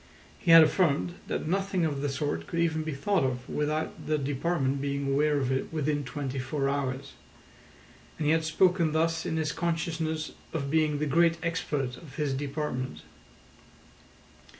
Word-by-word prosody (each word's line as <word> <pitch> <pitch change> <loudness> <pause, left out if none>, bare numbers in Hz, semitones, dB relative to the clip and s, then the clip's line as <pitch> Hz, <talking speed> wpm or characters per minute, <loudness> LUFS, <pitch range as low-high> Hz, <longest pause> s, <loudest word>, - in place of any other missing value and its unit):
He 175 - -3
had 165 -1 +11
affirmed 165 0 +2
that - - -2
nothing 190 0 0
of 145 -3 -2
the 145 - 0
sort 145 +1 -2
could 170 - -3
even 160 -2 +1
be 155 -2 -4
thought 200 +5 +1
of 125 -1 -2
without 150 +1 -2
the 155 0 +2
department 140 0 0
being 140 0 -1
aware 150 +1 +3
of 135 -2 0
it 130 - -1
within 150 -2 0
twenty 135 0 -4
four 135 +2 -1
hours; 135 -1 -2 1.0
and 155 - -2
he 150 - +4
had 160 0 +2
spoken 170 0 +3
thus 165 0 +1
in 160 - -1
his 155 -1 0
consciousness 160 -2 -2 0.2
of 140 -4 -2
being 155 -2 +2
the 150 - -1
great 165 +3 +3
expert 145 -7 -2
of 145 -5 -13
his 150 -3 -1
department. 140 -2 -3
150 Hz, 165 wpm, -28 LUFS, 140-165 Hz, 1.0 s, had